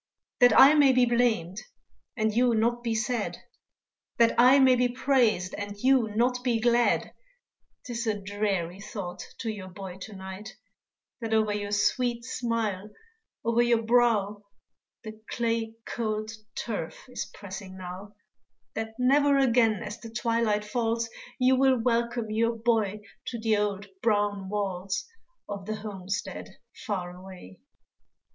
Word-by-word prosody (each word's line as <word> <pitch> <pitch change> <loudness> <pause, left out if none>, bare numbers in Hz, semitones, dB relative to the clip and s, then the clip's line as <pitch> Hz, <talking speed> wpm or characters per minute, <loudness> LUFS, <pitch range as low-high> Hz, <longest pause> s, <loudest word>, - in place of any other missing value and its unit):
That 245 -3 +6
I 275 +3 +9
may 285 -3 +5
be 250 -1 +5
blamed, 230 -7 +1 0.6
and 220 -1 +1
you 240 +1 +3
not 235 +2 +1
be 230 -2 -1
sad, 220 0 -1 0.8
That 230 -1 +5
I 255 +3 +7
may 260 -2 +6
be 250 0 +3
praised, 240 -7 +1
and 205 0 -6
you 255 +1 +3
not 250 +2 +1
be 240 -2 +1
glad; 240 +1 +2 0.7
'Tis 235 -1 -4
a 210 -2 0
dreary 195 -3 -2
thought 200 -4 -6 0.2
to 225 - -2
your 200 -3 -8
boy 185 0 -8
to 205 +2 -9
night, 190 +4 -8 0.6
That 225 -2 -1
over 215 -1 +2
your 205 0 -3
sweet 235 +3 +1
smile, 220 -6 -2 0.6
over 230 +1 +3
your 235 -1 +2
brow, 220 -3 +2 0.6
The 220 -1 -9
clay 230 -1 -1
cold 215 -2 -3 0.2
turf 205 -5 -5
is 250 - -5
pressing 190 -1 -8
now, 185 +3 -8 0.6
That 220 0 -5
never 280 +3 +4
again 235 -5 +3
as 210 +1 -7
the 230 - -9
twilight 230 -2 0
falls 230 +1 -1 0.3
You 255 0 +4
will 265 -1 +4
welcome 235 -1 0
your 230 +2 +1
boy 220 -3 0 0.3
to 235 - -4
the 220 -1 +2
old 200 -1 -1 0.2
brown 205 -3 0
walls 195 -2 -2 0.4
Of 200 -1 -6
the 215 - -2
homestead 205 -2 -5 0.2
far 180 -4 -4
away. 180 - -12
220 Hz, 140 wpm, -27 LUFS, 205-240 Hz, 0.8 s, I